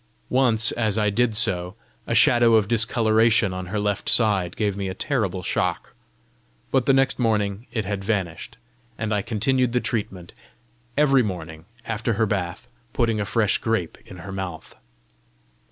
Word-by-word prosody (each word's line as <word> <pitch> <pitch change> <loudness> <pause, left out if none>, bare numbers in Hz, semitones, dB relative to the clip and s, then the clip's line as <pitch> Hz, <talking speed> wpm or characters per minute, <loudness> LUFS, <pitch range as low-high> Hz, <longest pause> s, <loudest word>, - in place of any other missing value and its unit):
Once 120 -4 +3
as 110 -3 -1
I 105 -1 +1
did 115 +1 +1
so, 90 -3 +1 0.3
a 115 - -1
shadow 120 +1 +5
of 105 -3 +3
discoloration 110 -2 +2
on 90 0 -6
her 105 +3 -3
left 105 -1 -1
side 100 -6 +2
gave 105 -3 -1
me 100 -1 -3
a 95 - -5
terrible 100 -9 -2
shock, - - -2 0.8
but 130 -2 +1
the - - +6
next 135 0 +2
morning 105 -2 0
it 110 -4 -2
had 100 -1 -3
vanished, 95 -6 -3 0.4
and 110 -1 -2
I 105 - +1
continued 120 +4 0
the 125 - +2
treatment 95 -7 -4 0.6
every 140 -3 +4
morning, 85 -6 -5 0.2
after 115 +1 -2
her 110 +2 +1
bath, 95 -4 -3 0.3
putting 115 -3 0
a - - -2
fresh 100 +2 +1
grape 110 -8 -2
in 90 - -11
her 95 - -7
mouth. 95 -4 -6
105 Hz, 160 wpm, -23 LUFS, 95-115 Hz, 0.8 s, the